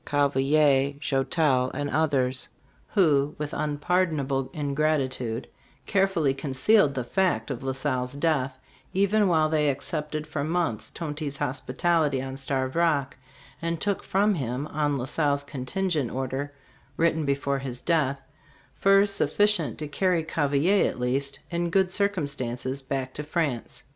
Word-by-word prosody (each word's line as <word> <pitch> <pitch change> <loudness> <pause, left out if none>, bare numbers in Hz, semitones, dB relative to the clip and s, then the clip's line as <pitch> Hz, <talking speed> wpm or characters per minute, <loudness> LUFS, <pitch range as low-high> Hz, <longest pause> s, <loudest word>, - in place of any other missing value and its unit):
Cavelier, 140 0 +2
Joutel 135 -2 +1
and 145 +1 -2
others, 140 -4 +1 0.4
who, 150 -7 +2
with 150 -1 -4
unpardonable 145 -3 0
ingratitude, 140 -5 -1 0.4
carefully 190 -8 +2
concealed 140 +4 +2
the 130 - -1
fact 140 - 0
of 125 - -4
La 135 0 -2
Salle's 130 -2 -2
death, 140 -3 0 0.4
even 200 +2 +3
while 160 -3 +3
they 155 -1 +2
accepted 150 +2 -3
for 145 -2 -3
months 160 -8 -1
Tonty's 150 -3 -4
hospitality 145 +3 0
on 130 0 -5
Starved 130 -1 -2
Rock, 155 -5 +1 0.5
and 170 0 -2
took 200 +1 -1
from 205 +2 +2
him, 130 -4 -2
on 145 -1 0
La 125 - -3
Salle's 140 0 0
con 135 -3 -7
tingent 175 -8 -1
order 135 +2 -3 0.5
written 160 -1 +2
before 140 -1 0
his 130 -2 -5
death, 145 -5 +1 0.5
furs 195 +1 +4
sufficient 205 -4 +2
to 150 - -4
carry 175 +2 +1
Cavelier, 160 +5 +2
at - - -7
least, 135 +3 -1
in 170 0 -1
good 190 +1 +2
circumstances 140 - -2
back 130 -1 -3
to - - -4
France. 150 -6 -2
145 Hz, 135 wpm, -26 LUFS, 135-165 Hz, 0.5 s, furs